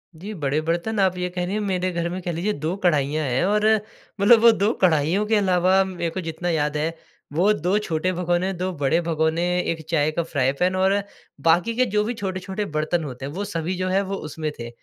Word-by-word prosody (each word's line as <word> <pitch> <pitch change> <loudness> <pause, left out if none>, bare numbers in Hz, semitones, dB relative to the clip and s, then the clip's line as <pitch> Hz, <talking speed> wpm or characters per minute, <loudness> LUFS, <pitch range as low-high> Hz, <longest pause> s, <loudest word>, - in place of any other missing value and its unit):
जी, 200 +7 -7
बड़े 145 -3 -1
बर्तन 175 +7 -1
आप 185 -2 +2
ये 180 0 -2
कह 180 0 -1
रहीं, 205 +4 -2
मेरे 185 -3 -1
घर 170 0 -2
में 185 +1 -5
कह 175 - -3
लीजिए 180 +6 -1
2 160 +3 -3
कढ़ाइयाँ 155 -4 +1
हैं 130 +6 +1
और 210 +1 +2 0.5
मतलब 220 +3 +6
वो 230 0 +8
2 215 0 +1
कढ़ाइयों 170 +3 +3
के 220 +1 +2
अलावा 185 -1 +3
मैं 175 -3 -3
को 185 - -4
जितना 165 +2 -4
याद 150 -2 0
है, 165 +2 -1 0.4
वो 180 +7 +3
2 185 +2 0
छोटे 180 -2 -1
भगोने, 175 +1 0
2 185 +1 -3
बड़े 140 +4 +3
भगोने, 160 0 0 0.2
1 165 -2 -3
चाय 155 -2 +2
का 170 - -1
फ्राई 140 -5 0
पैन 185 +1 +2
और 190 +1 +3 0.5
बाकी 175 +8 +3
के 255 - +3
जो 210 - +3
भी 230 +3 -2
छोटे-छोटे 190 -1 -4
बर्तन 160 +2 0
होते 135 -2 -6
हैं 140 - -5
वो 200 +4 -3
सभी 175 -2 -3
जो 185 - -1
है 195 +1 +2
वो 195 0 -4
उसमें 155 -1 -4
थे 115 - -5
180 Hz, 225 wpm, -23 LUFS, 160-195 Hz, 0.5 s, वो